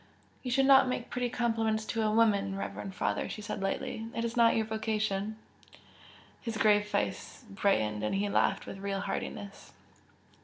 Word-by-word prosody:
"You 255 - -4
should 270 +2 +3
not 270 -1 +7
make 250 -1 -3
pretty 250 -1 -1
compliments 225 -2 0
to 225 - -2
a 215 - +2
woman, 205 -3 +2
reverend 195 -1 -5
father!" - - -1
she 210 - -6
said, 205 - -4
lightly 215 +3 -2
"It 230 - -1
is 230 - -3
not 235 -1 +5
your 220 - +1
vocation!" 215 -1 -2 1.0
His 230 -2 -4
grave 210 -1 +4
face 210 - -3
brightened 150 - +1
and 105 - 0
he 200 +1 +1
laughed 200 - +1
with 195 - -8
real 195 0 -2
heartiness. 200 0 -5
215 Hz, 165 wpm, -30 LUFS, 200-230 Hz, 1.0 s, not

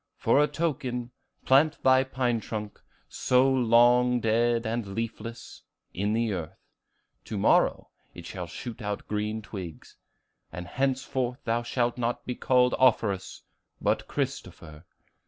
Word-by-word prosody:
For 145 - +3
a 150 - +4
token, 135 -6 -3 0.3
plant 150 +4 +4
thy 130 0 +5
pine 125 -3 -1
trunk, 105 -1 -6 0.3
so 125 +1 +2
long 125 -1 +4
dead 115 +1 +1
and 110 -3 -3
leafless, 115 0 -6 0.3
in 100 +3 -1
the 115 -1 0
earth; 85 -4 -6 0.7
to 105 - -5
morrow 100 - +2 0.2
it - - -10
shall - - -6
shoot 120 -1 -8
out 105 -1 -4
green 105 +1 -2
twigs. 90 -7 -9 0.5
And 90 +2 -6
henceforth 130 +2 -2
thou 115 +1 0
shalt 120 0 -1
not 120 0 -2
be 125 - -2
called 125 0 +2
Offerus, 110 -7 +1 0.4
but - - 0
Christopher. 75 -1 -5
120 Hz, 130 wpm, -27 LUFS, 110-125 Hz, 0.7 s, thy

